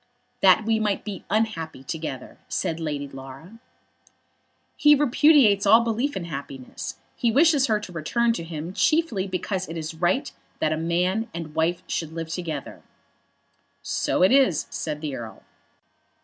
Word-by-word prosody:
"That 190 +3 +5
we 225 0 +2
might 210 -2 -1
be 205 -3 -6
unhappy 180 -10 -1
together," 155 -2 -6
said 165 0 -2
Lady 145 -3 -3
Laura. 135 +10 -11 1.2
"He 295 0 +6
repudiates 270 -7 +4
all 225 +3 +7
belief 235 +5 -1
in 175 - -4
happiness. 140 -5 -7 0.2
He 235 - +1
wishes 290 +1 +4
her 215 -2 +2
to 185 - -8
return 230 +9 0
to 170 - -4
him 165 +1 -6
chiefly 305 - +1
because 185 0 -3
it 165 - -5
is 160 0 -5
right 180 - 0 0.3
that 155 - +1
a - - 0
man 180 +7 0
and 165 -2 -6
wife 160 +2 0
should 160 -1 -3
live 165 -1 -5
together." 160 -5 -5 1.0
"So - - 0
it 185 - +5
is," 260 - +4
said 150 -2 -4
the 150 -4 -4
Earl. 115 -3 -9
180 Hz, 150 wpm, -24 LUFS, 160-225 Hz, 1.2 s, all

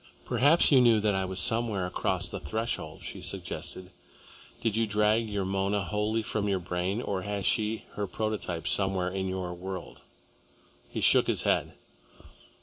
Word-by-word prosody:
"Perhaps 150 +6 +4
you 135 -3 +7
knew 115 -3 +5
that 105 -1 +1
I 95 0 0
was 95 0 -5
somewhere 110 0 +2
across 90 - -1
the - - -6
threshold," 95 -3 -4
she - - -6
suggested. 90 -1 -4 0.7
"Did 110 -2 0
you 115 0 +2
drag 105 +2 +2
your 100 -2 -2
Mona 95 +1 0
wholly 105 +5 -1
from 105 -1 -1
your 95 - +2
brain, 90 +5 -2
or 95 -2 -2
has 100 -1 -3
she 110 0 +1
her 105 -1 -3
prototype 95 -5 -3
somewhere 95 -2 +1
in 95 0 -3
your 95 -1 -3
world?" 90 +1 -7 0.9
He - - -4
shook - - +5
his - - 0
head. - - +1
100 Hz, 160 wpm, -29 LUFS, 95-110 Hz, 0.9 s, you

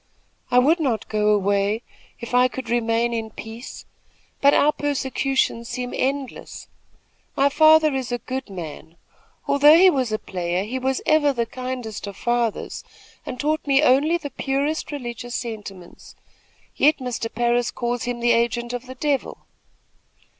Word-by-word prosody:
I 245 - +2
would 300 +7 +4
not 255 -8 -1
go 210 -1 0
away, 205 +2 +1 0.4
if 235 0 -8
I 250 +1 +5
could 255 -2 -7
remain 235 0 +1
in 225 -1 -3
peace; 225 +3 -9 0.6
but 280 - +6
our 290 +1 +4
persecutions 270 -4 -1
seem 250 -1 -4
endless. 270 0 -3 0.7
My 275 +1 +3
father 310 0 +5
is 260 -2 -3
a 245 - 0
good 260 +1 -6
man. 165 -2 -9 0.5
Although 295 +3 +6
he 370 +1 +7
was 260 -6 -1
a 215 - 0
player, 180 -2 -3
he 245 +5 -4
was 265 0 -1
ever 300 -2 +3
the 235 -2 -1
kindest 250 -3 -6
of 200 -1 -8
fathers, 240 -2 -1 0.4
and 250 - -6
taught 305 +1 -1
me 275 +1 +4
only 300 +5 +4
the 290 -4 -7
purest 280 +5 -2
religious 245 -3 -6
sentiments, 205 -6 -8 0.6
yet 300 +2 +4
Mr. 245 -3 -4
Parris 240 0 +1
calls 240 0 -3
him 245 -1 -3
the 240 0 +3
agent 240 +1 0
of 245 +1 -5
the 260 - -8
devil." 280 +1 -2
245 Hz, 155 wpm, -22 LUFS, 230-275 Hz, 0.7 s, he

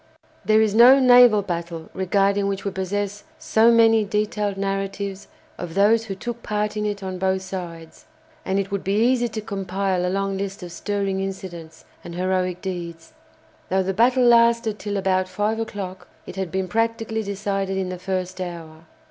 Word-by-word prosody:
There 215 0 +4
is 210 -2 0
no 245 +5 +8
naval 245 -5 +6
battle 170 -3 -5
regarding 200 +1 +1
which 195 0 -3
we 200 - -1
possess 200 +2 -3
so 225 +1 +3
many 225 -1 +5
detailed 210 -1 -1
narratives 195 0 -3 0.3
of 175 -2 -6
those 220 +3 +4
who 195 -3 -5
took 235 +4 -6
part 210 0 -2
in 210 0 -1
it 205 -1 -4
on 185 -1 -5
both 190 0 0
sides, 170 -4 -8 0.4
and 190 - -1
it 195 0 -2
would 200 -1 -2
be 195 +1 0
easy 240 +2 +2
to 220 -1 -5
compile 195 -2 -2
a 180 - 0
long 195 0 -1
list 195 -1 -5
of 175 - -8
stirring 195 +1 -2
incidents 175 -4 -7 0.2
and 170 - -8
heroic 185 0 -1
deeds. 170 -3 -6 0.6
Though 190 +1 +2
the 190 +1 -2
battle 250 +5 +3
lasted 235 -2 +4
till 205 -1 -3
about 185 -1 +1
five 215 +3 -1
o'clock, 190 -5 -6 0.2
it - - -9
had 190 -3 -4
been 190 +1 -2
practically 225 +2 -1
decided 195 -1 -2
in 190 -1 -2
the 180 -1 -6
first 185 0 -3
hour. 165 -2 -8
195 Hz, 175 wpm, -23 LUFS, 185-215 Hz, 0.6 s, no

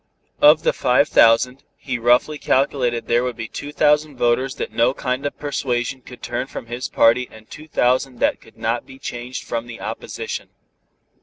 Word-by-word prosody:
Of 150 +2 +7
the - - +2
five 125 +4 +2
thousand, 125 +4 +4
he 130 -3 -4
roughly 125 +6 +3
calculated 125 -3 +1
there 120 +1 +2
would 125 -1 -2
be 115 0 -5
two 145 +6 -7
thousand 150 -1 +2
voters 125 +2 +1
that - - -4
no 120 +3 +2
kind 130 +2 -2
of - - -7
persuasion 130 -3 -2
could 125 0 -13
turn 120 +2 -3
from - - -7
his 120 +2 -5
party 120 +2 +3
and 110 0 -15
two 155 +1 -11
thousand 130 -2 +1
that - - +1
could 115 - -19
not 115 +2 -2
be 130 - -12
changed 120 -1 -6
from 115 0 -4
the 115 -1 -9
opposition. - - -5
125 Hz, 180 wpm, -21 LUFS, 120-135 Hz, -, Of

